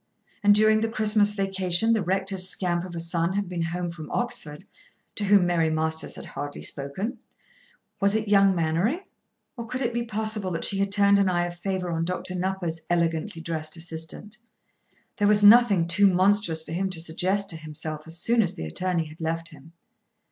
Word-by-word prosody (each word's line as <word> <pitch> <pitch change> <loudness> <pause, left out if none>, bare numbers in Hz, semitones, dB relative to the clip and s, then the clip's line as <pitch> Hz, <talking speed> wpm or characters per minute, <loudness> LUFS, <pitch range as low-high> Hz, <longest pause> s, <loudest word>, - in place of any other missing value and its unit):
And 205 0 +5
during 215 +1 +4
the 225 - 0
Christmas 210 -2 +2
vacation 195 +2 +2
the 220 - +1
rector's 190 0 0
scamp 175 -2 -1
of 175 -2 -9
a - - -3
son 170 +1 0
had 200 0 -1
been 175 -1 -4
home 175 +1 -3
from 160 -2 -9
Oxford, 155 -11 -3 0.5
to 210 - -1
whom 200 -2 +5
Mary 170 -2 +1
Masters 160 0 -2
had - - -9
barely 145 0 -6
spoken. 150 - -4 0.8
Was 200 +1 +2
it 220 0 -1
young 195 -2 +4
Mainwaring? 170 - 0 0.5
Or 235 -3 -7
could 255 +2 -4
it 240 0 -1
be 235 - -1
possible 215 -3 -2
that 165 - -3
she 195 - 0
had 195 0 0
turned 200 0 +4
an 195 -1 +3
eye 175 -1 +1
of 175 0 -6
favour 180 0 -3
on 165 0 -1
Dr. 180 +1 -4
Nupper's 180 -3 -3
elegantly 165 +1 -1
dressed 160 -1 -4
assistant. 165 +7 -7 0.8
There 205 - +2
was 210 0 +4
nothing 205 -5 +6
too 200 +3 +4
monstrous 185 -3 +2
for - - -10
him 190 +3 -1
to 180 -3 -3
suggest 185 +5 -1
to - - -7
himself 155 0 -6
as 165 +1 -5
soon 230 +6 +2
as 185 -5 -1
the 80 - -5
attorney 170 - -1
had 155 +1 -13
left 165 +1 -2
him. 155 +1 -15
185 Hz, 190 wpm, -25 LUFS, 165-205 Hz, 0.8 s, nothing